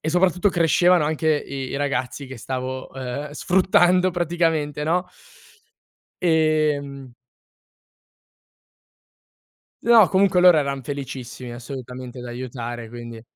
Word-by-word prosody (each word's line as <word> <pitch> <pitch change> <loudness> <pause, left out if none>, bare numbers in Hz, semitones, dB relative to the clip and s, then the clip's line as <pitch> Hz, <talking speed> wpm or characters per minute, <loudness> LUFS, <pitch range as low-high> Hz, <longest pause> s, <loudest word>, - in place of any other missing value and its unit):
E - - -4
soprattutto 180 +3 +2
crescevano 175 0 +3
anche 155 +1 -1 0.2
i 135 -1 -5
i - - -3
ragazzi 140 -1 -2
che 130 0 -9
stavo, 130 +2 -5
ehm, 135 +2 -5
sfruttando 180 +3 +3
praticamente, 165 -4 -1
no? 180 +4 +1 1.2
Ehm 150 -5 0 2.7
No, 230 -4 +6
comunque 190 -1 +3
loro 180 -2 +7
eran 140 -2 -1
felicissimi 130 -3 -7
assolutamente 125 0 -8
di 125 - -8
aiutare 120 -1 -6
quindi 120 -1 -9
145 Hz, 105 wpm, -22 LUFS, 130-175 Hz, 2.7 s, loro